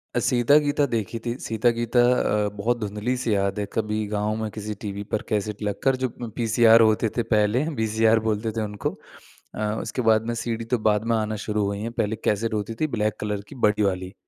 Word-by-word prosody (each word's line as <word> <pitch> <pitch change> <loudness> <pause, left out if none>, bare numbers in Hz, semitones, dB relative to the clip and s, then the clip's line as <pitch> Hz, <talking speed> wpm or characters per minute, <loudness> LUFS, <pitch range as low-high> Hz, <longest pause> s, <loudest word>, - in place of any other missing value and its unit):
अ, - - +3
सीता-गीता 145 +4 +3
देखी 115 0 -2
थी 120 - -1
सीता-गीता 115 +2 +1 0.5
अ, 105 - -1
बहुत 115 +4 0
धुँधली-सी 110 +3 -2
याद 100 +1 0
है 105 - -1
कभी 110 0 -1
गाँव 105 +1 -1
में 110 - -2
किसी 105 0 -5
टीवी 100 -1 -4
पर 110 - +1
कैसेट 105 0 -2
लगकर 105 +6 0
जो 130 -2 -2
म 120 - -4
पीसीआर 115 0 +5
होते 110 0 +3
थे 120 - +2
पहले 105 +5 +3 0.2
वीसीआर 110 +1 +3
बोलते 110 +1 0
थे 110 - +1
उनको। 105 -1 -3 0.7
अ, - - -6 0.2
उसके 125 - -3
बाद 110 -1 +3
में 120 - -1
सीडी 115 0 -3
तो - - +5
बाद 105 0 +1
में - - +3
आना 110 0 -1
शुरू 105 -1 0
हुई 100 0 -2
हैं। 115 +2 -3
पहले 110 -2 -1
कैसेट 110 +2 0
होती 105 +1 -2
थी 155 - +3
ब्लैक 105 0 0
कलर 105 -1 -2
की - - -10
बड़ी 105 0 +1
वाली। 95 -1 -1
110 Hz, 205 wpm, -24 LUFS, 105-115 Hz, 0.7 s, पीसीआर